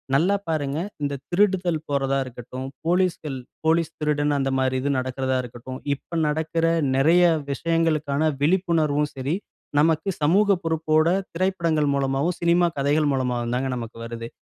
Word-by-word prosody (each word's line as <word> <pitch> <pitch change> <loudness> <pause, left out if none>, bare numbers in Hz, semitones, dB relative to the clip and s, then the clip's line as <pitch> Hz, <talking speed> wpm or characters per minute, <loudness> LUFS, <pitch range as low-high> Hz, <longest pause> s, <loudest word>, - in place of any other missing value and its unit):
நல்லா 180 +8 +3
பாருங்க 145 -2 -1 0.2
"இந்த 140 0 -1 0.2
திருடுதல் 180 -3 +2
போறதா 135 -1 +1
இருக்கட்டும், 125 +1 -8 0.2
போலீஸ்கள் 170 -6 0 0.3
"போலீஸ்- 165 0 +2
திருடன்" 150 -1 +1
அந்த 135 0 0
மாரி 130 0 +1
இது 140 - -1
நடக்குறதா 130 0 -2
இருக்கட்டும்" 125 +2 -8 0.2
இப்ப 170 +4 -7
நடக்குற 160 +2 0 0.3
நெறைய 165 +6 +5 0.3
விஷயங்களுக்கான 155 -1 +1
விழிப்புணர்வும் 155 -4 +2
சரி, 135 +5 -1 0.4
நமக்கு 160 +4 +2
சமூக 200 +6 +4
பொறுப்போட 160 0 +2 0.3
திரைப்படங்கள் 165 -4 +1
மூலமாவும், 140 +5 0
சினிமா 170 +1 +4
கதைகள் 145 +2 +2
மூலமாகவும் 125 -2 -1
தாங்க 130 +1 -1
நமக்கு 115 -2 -7
வருது. 115 0 -6
150 Hz, 130 wpm, -24 LUFS, 135-165 Hz, 0.4 s, நெறைய